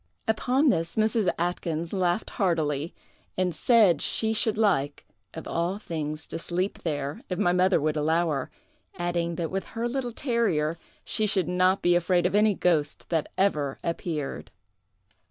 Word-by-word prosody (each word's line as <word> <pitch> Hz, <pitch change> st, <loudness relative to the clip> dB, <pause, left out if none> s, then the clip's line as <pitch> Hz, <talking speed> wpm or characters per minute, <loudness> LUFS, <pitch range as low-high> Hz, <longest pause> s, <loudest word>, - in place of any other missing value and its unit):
Upon 255 Hz, +6 st, +2 dB
this 165 Hz, -5 st, 0 dB
Mrs. 215 Hz, -3 st, +2 dB
Atkyns 170 Hz, -1 st, -2 dB
laughed 180 Hz, +1 st, 0 dB
heartily, 160 Hz, -, 0 dB, 0.5 s
and 180 Hz, -1 st, +1 dB
said 205 Hz, -, +4 dB
she 220 Hz, 0 st, 0 dB
should 220 Hz, -1 st, +1 dB
like, 150 Hz, -10 st, +1 dB, 0.3 s
of -, -, -7 dB
all 170 Hz, +4 st, -1 dB
things, 155 Hz, -6 st, -5 dB
to -, -, -4 dB
sleep 180 Hz, +4 st, -2 dB
there, 145 Hz, -3 st, -3 dB
if 180 Hz, -, -2 dB
my 175 Hz, 0 st, +2 dB
mother 185 Hz, 0 st, +3 dB
would 155 Hz, +1 st, 0 dB
allow 160 Hz, +2 st, +1 dB
her, 135 Hz, -3 st, -2 dB, 0.5 s
adding, 175 Hz, -1 st, -1 dB
that 165 Hz, -1 st, -3 dB
with 195 Hz, 0 st, -3 dB
her 235 Hz, +1 st, 0 dB
little 245 Hz, 0 st, -2 dB
terrier 200 Hz, -, 0 dB, 0.3 s
she 215 Hz, -, 0 dB
should 190 Hz, -5 st, +1 dB
not 185 Hz, +2 st, +2 dB
be 175 Hz, -, +4 dB
afraid 175 Hz, 0 st, +2 dB
of 180 Hz, -, +1 dB
any 210 Hz, 0 st, +4 dB
ghost 155 Hz, -5 st, 0 dB
that 165 Hz, -3 st, 0 dB
ever 150 Hz, -8 st, +1 dB
appeared. 165 Hz, -3 st, -3 dB
175 Hz, 155 wpm, -26 LUFS, 160-205 Hz, 0.5 s, said